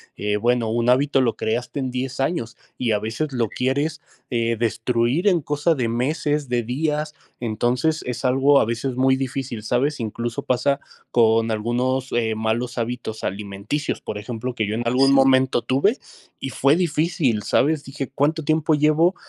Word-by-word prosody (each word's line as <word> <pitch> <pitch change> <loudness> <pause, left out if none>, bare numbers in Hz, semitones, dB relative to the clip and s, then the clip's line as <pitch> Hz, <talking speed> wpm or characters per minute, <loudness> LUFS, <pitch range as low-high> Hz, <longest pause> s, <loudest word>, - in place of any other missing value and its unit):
eh, 105 0 -1
bueno, 120 +1 +1
un 120 +2 +1
hábito 135 +2 +3
lo 125 -3 +1
creaste 120 +5 -2
en 130 -2 -2
10 130 +2 -4
años, 135 -6 -2 0.2
y 120 -3 0
a 105 - +2
veces 115 +8 -3
lo 115 -4 0
quieres, 145 +7 -1 0.3
eh, 115 -2 0
destruir 120 - 0
en 180 -4 +4
cosa 150 +3 +1
de 120 -5 -1
meses, 145 +4 -1
de 120 -1 0
días. 150 +5 -2 0.3
Entonces, 120 +7 0
es 125 0 -4
algo 135 +2 +4
a - - +2
veces 115 +3 -2
muy 130 +1 +3
difícil, 130 -4 -4
¿sabes? 135 +6 0
Incluso 115 +1 -3
pasa 135 +3 +1 0.3
con 115 -1 +3
algunos, 125 +4 -1
eh, 115 -2 +1
malos 115 +3 -2
hábitos 115 -2 -4
alimenticios, 100 +8 -3
por 105 - -6
ejemplo, 120 +3 -5
que 110 -3 -1
yo 105 - -2
en 120 +1 -2
algún 135 +3 +4
momento 130 -2 +4
tuve 170 - +2 0.4
y 135 - -4
fue 140 +3 +3
difícil, 160 - +1
¿sabes? 145 +7 +2
Dije: 135 0 -6
"Cuánto 155 +4 +1
tiempo 155 +1 +2
llevo 155 +5 +3
125 Hz, 170 wpm, -22 LUFS, 115-145 Hz, 0.4 s, en